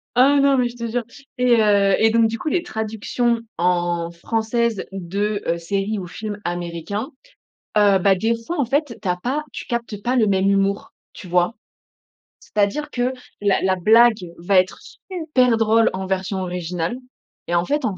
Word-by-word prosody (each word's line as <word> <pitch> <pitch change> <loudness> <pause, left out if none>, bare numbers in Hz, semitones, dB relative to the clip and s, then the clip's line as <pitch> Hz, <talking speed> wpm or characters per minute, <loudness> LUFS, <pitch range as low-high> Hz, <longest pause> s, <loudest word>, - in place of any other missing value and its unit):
Ah 275 +3 +5
non, 275 -1 +4
mais 250 -1 +2
je 240 - -9
te 235 -1 -4
jure! 245 0 -1 0.3
Et, 250 -1 +4
heu 200 -2 +4
et 225 - +4
donc 230 0 +4
du 230 +1 -4
coup, 310 - -3
les 345 +1 0
traductions 230 -3 -1 0.2
en 175 -1 0
françaises 225 +4 -1
de, 200 +3 -2
heu, 170 - +1
séries 195 +5 -2
ou 180 - -6
films 210 +3 -6
américains. 175 - -4 0.7
Heu, 205 -2 +5
bah 195 +1 +4
des 225 +5 +1
fois, 345 +7 -4
en 280 - +2
fait, 275 -1 -1
tu 200 - -4
as 180 - +1
pas 260 +11 -2
tu - - -6
captes 235 -4 -4
pas 250 +2 0
le 225 -3 +4
même 195 -1 +2
humour, 200 0 0 0.2
tu 185 - -11
vois? 180 +4 +2 0.9
C'est-à-dire 215 +9 -1
que 245 +1 0 0.3
la 200 -2 +2
la 190 0 +2
blague 220 +3 +5
va 180 +3 +1
être 185 +1 +2
super 300 - 0
drôle 225 0 +3
en 190 0 -4
version 190 +1 -2
originale 180 +1 -3 0.5
et 175 - 0
en 170 +1 +2
fait, 295 -1 -1
en 205 -5 -1
210 Hz, 185 wpm, -21 LUFS, 185-240 Hz, 0.9 s, Ah